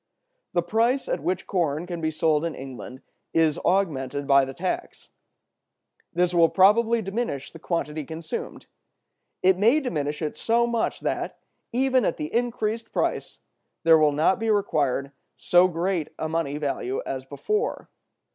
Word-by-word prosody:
The 175 Hz, -, +2 dB
price 230 Hz, +8 st, +1 dB
at -, -, -1 dB
which 185 Hz, 0 st, -2 dB
corn 165 Hz, -4 st, -1 dB
can 175 Hz, -2 st, -5 dB
be 160 Hz, -, +1 dB
sold 155 Hz, -1 st, +1 dB
in 165 Hz, -1 st, -2 dB
England 130 Hz, 0 st, -9 dB, 0.3 s
is 160 Hz, -2 st, +3 dB
augmented 145 Hz, -7 st, 0 dB
by 140 Hz, -1 st, +5 dB
the 135 Hz, -, -7 dB
tax. 185 Hz, +1 st, -4 dB, 1.0 s
This 180 Hz, +1 st, +1 dB
will 170 Hz, -1 st, +5 dB
probably 220 Hz, +4 st, +4 dB
diminish 195 Hz, -, -3 dB
the 165 Hz, -, -12 dB
quantity 155 Hz, -2 st, -2 dB
consumed. 160 Hz, +2 st, -6 dB, 0.8 s
It 185 Hz, 0 st, +4 dB
may 230 Hz, +9 st, +5 dB
diminish 150 Hz, -, -3 dB
it 150 Hz, -, -3 dB
so 235 Hz, +1 st, +2 dB
much 235 Hz, -1 st, -1 dB
that, -, -, -2 dB, 0.3 s
even 260 Hz, +1 st, +2 dB
at 170 Hz, -, 0 dB
the 150 Hz, -, -5 dB
increased 230 Hz, -2 st, -1 dB
price, -, -, -2 dB, 0.5 s
there 165 Hz, -1 st, +6 dB
will 150 Hz, -1 st, +4 dB
not 155 Hz, +6 st, +2 dB
be 225 Hz, 0 st, -1 dB
required 145 Hz, -10 st, +1 dB, 0.3 s
so 175 Hz, +1 st, +5 dB
great 175 Hz, -1 st, -1 dB
a 160 Hz, -, -2 dB
money 155 Hz, -3 st, -2 dB
value 135 Hz, -3 st, -2 dB
as 130 Hz, -1 st, -4 dB
before. 425 Hz, -, -2 dB
170 Hz, 150 wpm, -25 LUFS, 150-210 Hz, 1.0 s, there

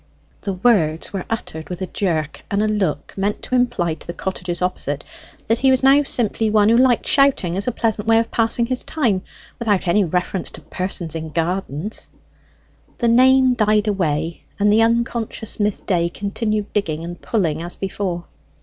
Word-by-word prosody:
The 200 Hz, -, -3 dB
words 180 Hz, -7 st, +1 dB
were 190 Hz, -2 st, -3 dB
uttered 160 Hz, -9 st, -5 dB
with 180 Hz, -, -5 dB
a -, -, 0 dB
jerk 165 Hz, -6 st, -2 dB
and 200 Hz, +1 st, +1 dB
a -, -, +2 dB
look 195 Hz, -9 st, -1 dB
meant 200 Hz, +2 st, -2 dB
to -, -, -6 dB
imply 240 Hz, -10 st, +1 dB
to -, -, -11 dB
the 170 Hz, -, -5 dB
cottages 180 Hz, -2 st, -3 dB
opposite 145 Hz, -6 st, -2 dB, 0.4 s
that 225 Hz, +1 st, +1 dB
he 265 Hz, -, +4 dB
was 260 Hz, 0 st, +3 dB
now 275 Hz, +2 st, +6 dB
simply 225 Hz, -5 st, +1 dB
one 210 Hz, 0 st, +4 dB
who 230 Hz, -, +5 dB
liked 250 Hz, -2 st, +3 dB
shouting 275 Hz, -, +3 dB
as 200 Hz, +4 st, -3 dB
a -, -, +2 dB
pleasant 220 Hz, -2 st, -1 dB
way 225 Hz, 0 st, +5 dB
of 225 Hz, 0 st, 0 dB
passing 230 Hz, +1 st, +1 dB
his 255 Hz, +1 st, -3 dB
time, 235 Hz, -12 st, 0 dB, 0.4 s
without 205 Hz, -6 st, 0 dB
any 205 Hz, +4 st, +4 dB
reference 180 Hz, +1 st, -1 dB
to -, -, -10 dB
persons 180 Hz, -3 st, -4 dB
in 160 Hz, -1 st, -5 dB
gardens. 170 Hz, +3 st, -3 dB, 0.9 s
The 235 Hz, -, +1 dB
name 260 Hz, +2 st, +5 dB
died 215 Hz, -2 st, +2 dB
away, 165 Hz, -5 st, -1 dB, 0.2 s
and 205 Hz, +1 st, +4 dB
the 220 Hz, -, +5 dB
unconscious 230 Hz, -1 st, -1 dB
Miss 205 Hz, -1 st, +1 dB
Day 170 Hz, -3 st, 0 dB
continued 210 Hz, +2 st, -2 dB
digging 165 Hz, -6 st, -1 dB
and 175 Hz, +1 st, -7 dB
pulling 165 Hz, -8 st, 0 dB
as 175 Hz, +1 st, -5 dB
before. 190 Hz, -3 st, -3 dB
205 Hz, 180 wpm, -20 LUFS, 175-230 Hz, 0.9 s, now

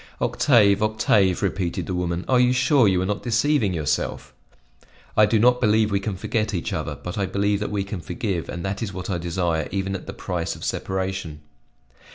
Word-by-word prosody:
"Octave, 105 Hz, -6 st, +3 dB
Octave," 105 Hz, -3 st, +2 dB
repeated 90 Hz, -3 st, -1 dB
the 95 Hz, -, -4 dB
woman, 90 Hz, 0 st, -2 dB
"are 130 Hz, -1 st, +3 dB
you 125 Hz, 0 st, +4 dB
sure 130 Hz, -1 st, +4 dB
you 95 Hz, -2 st, +2 dB
are -, -, -1 dB
not 105 Hz, +1 st, -2 dB
deceiving 120 Hz, -2 st, +1 dB
yourself?" 80 Hz, -5 st, -2 dB, 0.8 s
"I 105 Hz, -1 st, +6 dB
do 115 Hz, -, +2 dB
not 125 Hz, +3 st, +4 dB
believe 110 Hz, -1 st, +3 dB
we 100 Hz, -, +2 dB
can 100 Hz, 0 st, -3 dB
forget 105 Hz, +1 st, -1 dB
each 85 Hz, -, -3 dB
other; -, -, -3 dB
but 90 Hz, +3 st, -4 dB
I 100 Hz, -, 0 dB
believe 100 Hz, +2 st, 0 dB
that 105 Hz, -, -3 dB
we 100 Hz, -2 st, -1 dB
can 100 Hz, -2 st, -6 dB
forgive 90 Hz, +1 st, -3 dB
and 85 Hz, +1 st, -5 dB
that 95 Hz, +2 st, -3 dB
is 110 Hz, -4 st, -3 dB
what 95 Hz, +1 st, -5 dB
I 90 Hz, -, -1 dB
desire 85 Hz, -2 st, -1 dB
even 95 Hz, 0 st, -2 dB
at 95 Hz, -, -8 dB
the -, -, -5 dB
price 85 Hz, -3 st, -3 dB
of -, -, -11 dB
separation." 95 Hz, -5 st, -3 dB
100 Hz, 205 wpm, -23 LUFS, 90-110 Hz, 0.8 s, I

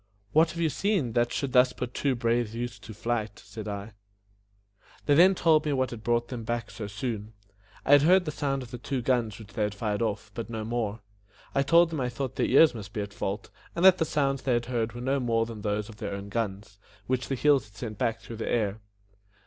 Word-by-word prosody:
"What 160 Hz, +2 st, +5 dB
have 170 Hz, -, -6 dB
you 160 Hz, -2 st, +2 dB
seen, 190 Hz, -, 0 dB
that 120 Hz, 0 st, +2 dB
should 135 Hz, -3 st, -2 dB
thus 125 Hz, 0 st, +5 dB
put 125 Hz, 0 st, -5 dB
two 140 Hz, -2 st, 0 dB
brave 115 Hz, -1 st, 0 dB
youths 120 Hz, -3 st, -4 dB
to 110 Hz, -, -11 dB
flight?" 110 Hz, -2 st, -2 dB
said 105 Hz, +1 st, -8 dB
I. 100 Hz, +1 st, -5 dB, 1.1 s
Then 145 Hz, -1 st, +4 dB
they 185 Hz, +3 st, +7 dB
told 160 Hz, -3 st, +4 dB
me 150 Hz, -2 st, 0 dB
what 130 Hz, -1 st, 0 dB
had 115 Hz, -2 st, -8 dB
brought 120 Hz, 0 st, +1 dB
them 120 Hz, -3 st, -5 dB
back 115 Hz, -1 st, -3 dB
so 105 Hz, -, -6 dB
soon. 105 Hz, 0 st, -4 dB, 0.5 s
I -, -, +1 dB
had 145 Hz, -1 st, +8 dB
heard 180 Hz, +4 st, +5 dB
the 155 Hz, -, -2 dB
sound 135 Hz, -2 st, -2 dB
of 120 Hz, -, -12 dB
the 125 Hz, -, -6 dB
two 130 Hz, 0 st, -3 dB
guns 115 Hz, -5 st, +1 dB
which 105 Hz, -2 st, -13 dB
they -, -, -3 dB
had 105 Hz, -1 st, 0 dB
fired 105 Hz, 0 st, -2 dB
off, 105 Hz, -2 st, -2 dB
but 115 Hz, 0 st, -5 dB
no 110 Hz, -2 st, -4 dB
more. 115 Hz, -2 st, -2 dB, 0.5 s
I 140 Hz, -, +3 dB
told 165 Hz, +4 st, +5 dB
them 155 Hz, -4 st, -2 dB
I 125 Hz, -, 0 dB
thought 130 Hz, +1 st, -4 dB
their -, -, +1 dB
ears 150 Hz, +4 st, +6 dB
must 105 Hz, -3 st, -8 dB
be 105 Hz, -, -2 dB
at 100 Hz, 0 st, -6 dB
fault, 100 Hz, +2 st, -4 dB, 0.2 s
and 170 Hz, -, +2 dB
that 185 Hz, -1 st, +8 dB
the 160 Hz, -, +2 dB
sounds 140 Hz, -3 st, 0 dB
they 130 Hz, -, +1 dB
had 120 Hz, 0 st, +1 dB
heard 115 Hz, -2 st, -1 dB
were 120 Hz, -, -7 dB
no 135 Hz, +2 st, +1 dB
more 115 Hz, -2 st, +1 dB
than 115 Hz, -2 st, -8 dB
those 105 Hz, 0 st, -1 dB
of 110 Hz, -, -12 dB
their 100 Hz, -1 st, -4 dB
own 100 Hz, 0 st, -7 dB
guns, 100 Hz, -2 st, -4 dB, 0.3 s
which 130 Hz, 0 st, -1 dB
the 135 Hz, -, -1 dB
hills 140 Hz, -2 st, +3 dB
had 105 Hz, -1 st, -21 dB
sent 110 Hz, -1 st, -6 dB
back 115 Hz, -1 st, 0 dB
through 115 Hz, -, -8 dB
the 110 Hz, -, -3 dB
air. 110 Hz, -2 st, 0 dB
120 Hz, 245 wpm, -28 LUFS, 110-135 Hz, 1.1 s, had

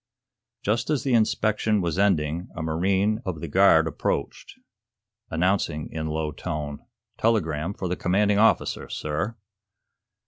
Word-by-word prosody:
Just 115 Hz, +4 st, 0 dB
as 150 Hz, -5 st, +1 dB
the 135 Hz, -, 0 dB
inspection 110 Hz, -1 st, +2 dB
was 85 Hz, -1 st, -1 dB
ending, 85 Hz, -3 st, +1 dB
a 80 Hz, -, -4 dB
marine 95 Hz, +7 st, +1 dB
of 90 Hz, -6 st, -4 dB
the -, -, -5 dB
guard 80 Hz, -1 st, +5 dB
approached, 80 Hz, -, -3 dB, 0.7 s
announcing 85 Hz, -3 st, 0 dB
in 80 Hz, 0 st, -3 dB
a -, -, -3 dB
low 80 Hz, -1 st, -2 dB
tone: 75 Hz, -3 st, -5 dB, 0.4 s
"Telegram 90 Hz, -5 st, 0 dB
for 95 Hz, -, -4 dB
the 90 Hz, -, -1 dB
commanding 100 Hz, +3 st, +2 dB
officer, 110 Hz, +1 st, +2 dB
sir." 95 Hz, +10 st, -3 dB
90 Hz, 135 wpm, -25 LUFS, 80-105 Hz, 0.7 s, guard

